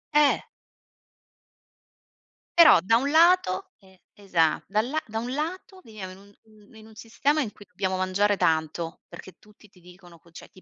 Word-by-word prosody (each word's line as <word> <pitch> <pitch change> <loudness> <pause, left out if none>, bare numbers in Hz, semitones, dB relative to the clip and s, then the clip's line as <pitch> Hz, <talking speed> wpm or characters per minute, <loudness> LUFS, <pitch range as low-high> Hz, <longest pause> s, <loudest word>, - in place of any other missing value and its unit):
Eh! 295 -1 +3 2.1
Però, 320 - +8
da 225 +6 +3
un 275 +4 -2
lato 330 - +3
e 190 -2 -23
esa 170 -6 0
da 215 +2 +1
la 290 +7 -3
da 220 +1 -6
un 245 +3 -4
lato, 370 +5 -6
viviamo 205 -4 -10
in 185 - -13
un 200 +1 -20
mhmm, 215 0 -22
in 220 0 -15
un 220 - -17
sistema 280 +7 -1
in 220 -7 -4
cui 205 - -17
dobbiamo 185 0 -3
mangiare 195 +2 0
tanto, 160 +2 -1
perché 180 +2 -12
tutti 210 0 -22
ti 185 - -23
dicono 175 -1 -17
co 170 - -24
cioè, 165 - -14
ti 185 - -20
205 Hz, 175 wpm, -25 LUFS, 185-245 Hz, 2.1 s, Però